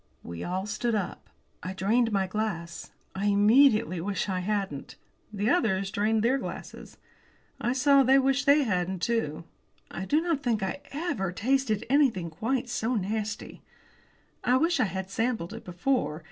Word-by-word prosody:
We 85 0 -7
all 185 +2 -2
stood 220 +3 -1
up. 200 -4 -4 0.3
I 185 +2 -5
drained 225 +5 +1
my 195 -2 +1
glass. 185 -4 -4 0.2
I 200 +2 -2
immediately 215 -2 +4
wished 195 +1 -2
I 185 - -1
hadn't. 190 -7 -3 0.4
The 210 +2 0
others 195 - +1
drained 215 +2 +1
their 260 +4 +2
glasses. - - -8 0.6
I 240 - 0
saw 275 +1 +5
they 265 +1 +5
wished 270 +1 +1
they 285 +1 +6
hadn't 185 -5 -1
too. 170 -10 -1 0.5
I 190 - -5
do 295 +9 +2
not 330 -4 -1
think 230 -6 0
I 190 +9 -3
ever 275 - -2
tasted 230 +1 0
anything 240 - +2
quite 240 +9 -2
so 240 0 -1
nasty. 210 +1 -3 0.8
I 250 +1 +3
wished 330 +4 +1
I - - +4
had 190 0 -5
sampled 225 -6 -1
it - - -8
before. 180 - -1
215 Hz, 160 wpm, -27 LUFS, 190-255 Hz, 0.8 s, they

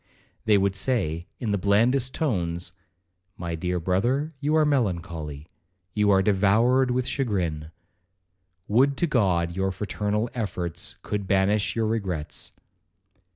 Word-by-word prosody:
They 105 -2 +5
would 100 0 +1
say, 95 -8 0
in 115 -4 -2
the 100 - +1
blandest 120 +7 +2
tones, 85 - -2 0.6
'My 85 -1 -4
dear 90 +2 -2
brother, 120 - 0
you 150 +2 +1
are 155 -1 +4
melancholy,—you 90 - -2
are 95 -1 +4
devoured 110 +6 +3
with 125 0 0
chagrin,—would 90 - -3
to - - +2
God 95 - +1
our 95 0 +1
fraternal 105 +3 -2
efforts 90 -7 -3
could 100 -2 -3
banish 100 +2 +2
your 115 -1 +1
regrets. 95 -9 -3
100 Hz, 115 wpm, -25 LUFS, 90-115 Hz, 0.6 s, They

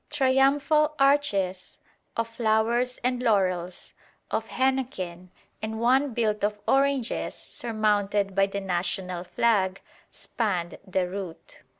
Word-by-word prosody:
Triumphal 290 +2 +3
arches 210 -10 +1 0.4
of 230 0 0
flowers 230 +2 +1
and 250 0 0
laurels, 185 -6 0 0.4
of 225 - -1
henequen, 240 -10 -2 0.3
and 220 0 -4
one 255 +2 +2
built 215 -3 0
of 210 0 +1
oranges 275 -3 +1
surmounted 205 -3 -1
by 195 +1 +3
the 200 0 -4
national 180 -1 -2
flag, 195 -2 +1 0.3
spanned 185 -7 -3
the 185 -1 0
route. 180 -3 -8
220 Hz, 105 wpm, -26 LUFS, 190-255 Hz, 0.4 s, Triumphal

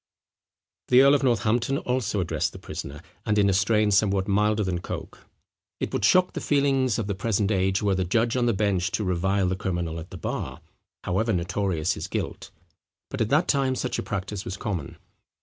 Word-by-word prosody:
The 125 +1 +6
earl 140 +1 +6
of 145 - +3
Northampton 120 +1 +1
also 125 -7 -1
addressed 90 - -1
the - - -9
prisoner, 70 +1 -7 0.2
and 105 -1 0
in 100 -1 +4
a - - 0
strain 105 +2 +2
somewhat 100 -1 +2
milder 105 +1 +2
than 90 -2 -1
Coke. - - -8 0.5
It - - -3
would - - -1
shock 180 - +4
the - - -4
feelings 135 -4 +2
of 115 - -2
the 100 - -2
present 100 +1 0
age 95 0 +1
were 100 -1 +2
the 95 0 0
judge 115 +6 +1
on 125 -1 +1
the 120 - +3
bench 95 -3 0
to 110 - 0
revile 95 +1 +1
the 95 - 0
criminal 85 -4 -3
at 80 - -9
the 90 - -8
bar, 65 -4 -4 0.4
however 110 +5 0
notorious 90 -1 0
his - - -5
guilt; - - -4 0.6
but - - -3
at 110 - +1
that 155 +7 +3
time 135 -2 +1
such 125 - -2
a - - 0
practice 100 0 -4
was 95 - -5
common. 95 - -4
100 Hz, 200 wpm, -25 LUFS, 95-115 Hz, 0.6 s, The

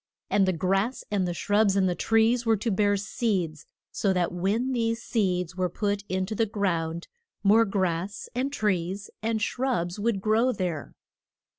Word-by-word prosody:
And 195 -2 +3
the - - +4
grass 195 +8 0
and 195 -3 +1
the 175 - -2
shrubs 205 +2 +2
and 195 -1 +3
the 180 - +1
trees 225 +5 +2
were 225 -2 +3
to 220 +3 -1
bear 205 +1 +2
seeds, 195 -7 -2 0.2
so 200 - 0
that 180 -2 0
when 205 +9 0
these 230 -2 -1
seeds 180 -5 0
were 185 -1 0
put 205 +2 -1
in 185 0 0
to 210 - -5
the 225 +1 +1
ground 170 -5 -1 0.4
more 215 +3 +5
grass 190 0 -2
and 260 +3 -1
trees 200 -4 -1
and 225 0 0
shrubs 220 -10 -1
would 215 -1 0
grow 220 +5 +2
there. 175 -6 -4
200 Hz, 170 wpm, -27 LUFS, 180-225 Hz, 0.4 s, more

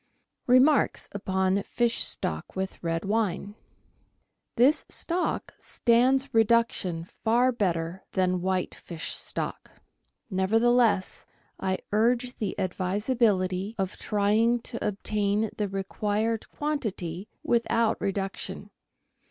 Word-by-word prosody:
Remarks 260 +4 +4
upon 190 0 0
Fish 235 +3 0
Stock - - -3
with 190 -1 -4
Red 165 +1 -1
Wine. 205 -1 -1 0.5
— - - -47
This 280 +6 +5
stock 355 +1 -2
stands 260 +3 +2
reduction 225 -7 +2
far 235 +8 +1
better 180 -5 -1
than 185 -1 +1
white 185 0 -1
fish 165 -2 -4
stock. - - -4 0.6
Nevertheless, 220 +1 +2 0.3
I 190 -1 0
urge 240 +4 +1
the 205 -4 -3
advisability 190 +1 0
of 195 -1 -2
trying 220 +3 +2
to 235 - -4
obtain 210 +1 0
the 210 -2 -2
required 210 +3 -2
quantity 210 - -3 0.2
without 230 -1 +1
reduction. 195 0 -3
210 Hz, 100 wpm, -27 LUFS, 190-235 Hz, 0.6 s, This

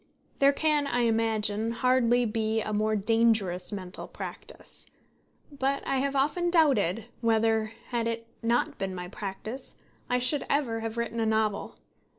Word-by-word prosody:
There 275 0 +6
can, 295 0 +1
I 245 -2 +1
imagine, 220 -2 +1
hardly 245 0 +3
be 220 0 0
a 215 -1 -3
more 215 +1 +1
dangerous 215 -4 +2
mental 185 -3 -6
practice; - - -6 0.6
but 275 0 -1
I 270 - 0
have 280 +1 0
often 300 +6 +1
doubted 235 - +3 0.2
whether, 225 -1 +2 0.2
had 235 -2 0
it 230 0 -3 0.2
not 235 +1 +1
been 190 -1 -2
my 180 0 -6
practice, 215 +5 -6 0.3
I 250 - +3
should 255 +3 0
ever 255 -6 +1
have 225 0 -4
written 235 0 -2
a 225 - +1
novel. 220 -2 0
230 Hz, 150 wpm, -28 LUFS, 215-255 Hz, 0.6 s, There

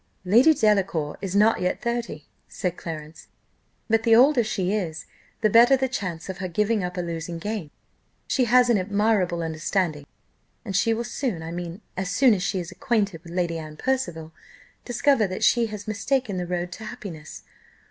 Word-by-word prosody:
"Lady 235 +12 +6
Delacour 195 - +1
is 195 -1 -4
not 210 0 +4
yet 180 0 0
thirty," 235 -11 -3 0.2
said 180 -2 -3
Clarence; 155 -2 -8 0.6
"but 225 0 +3
the 225 -1 +5
older 255 +1 +5
she 195 -3 -1
is, 175 -5 -3 0.4
the 215 - +4
better 235 +5 +6
the 265 0 0
chance 185 -10 -4
of 190 -2 -6
her 185 - -3
giving 210 +3 0
up 180 +1 -4
a - - 0
losing 170 0 -5
game. 205 -2 -4 0.6
She 255 - +1
has 245 +1 +5
an 215 - +3
admirable 195 -3 +1
understanding, 160 -1 -2 0.6
and 195 -3 -4
she 225 +4 +3
will 225 +1 -1
soon 230 - -3
I 165 - -6
mean 175 +3 -6
as 190 0 -3
soon 235 +4 +4
as 190 - -1
she 190 0 -1
is 175 0 -6
acquainted 200 -3 -1
with 170 -1 -11
Lady 170 -2 -1
Anne 155 -1 -9
Percival 175 -12 -2 0.5
discover 255 -2 +2
that 185 0 -4
she 235 -1 +4
has 210 -1 -8
mistaken 220 0 -1
the 180 -1 -3
road 175 0 -3
to 220 +4 -8
happiness. 180 -10 -9
195 Hz, 180 wpm, -24 LUFS, 175-230 Hz, 0.6 s, Lady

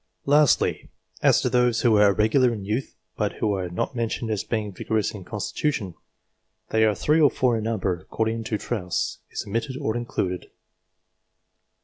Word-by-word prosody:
Lastly, 145 -1 +3 0.3
as - - +4
to - - 0
those 125 -2 +3
who 120 - +4
were 105 -1 +6
irregular 110 +5 +3
in 105 -4 -5
youth 110 +6 -3 0.2
but 105 -1 -1
who 105 -2 0
are 95 -2 -2
not 90 +9 -3
mentioned 115 -1 -2
as 105 - -1
being 110 -3 -2
vigorous 110 +2 -1
in 100 -3 -8
constitution. 105 - -2 0.8
They 110 0 +3
are 105 -1 +2
3 150 +9 +2
or 145 - +7
4 125 -4 +1
in 110 - -4
number, 95 -6 -1
according 110 +3 -2
as 105 - 0
Trosse 90 -7 -2
is - - -5
omitted 115 +6 -3
or 125 -6 -2
included. 95 -6 -3
110 Hz, 165 wpm, -24 LUFS, 105-120 Hz, 0.8 s, or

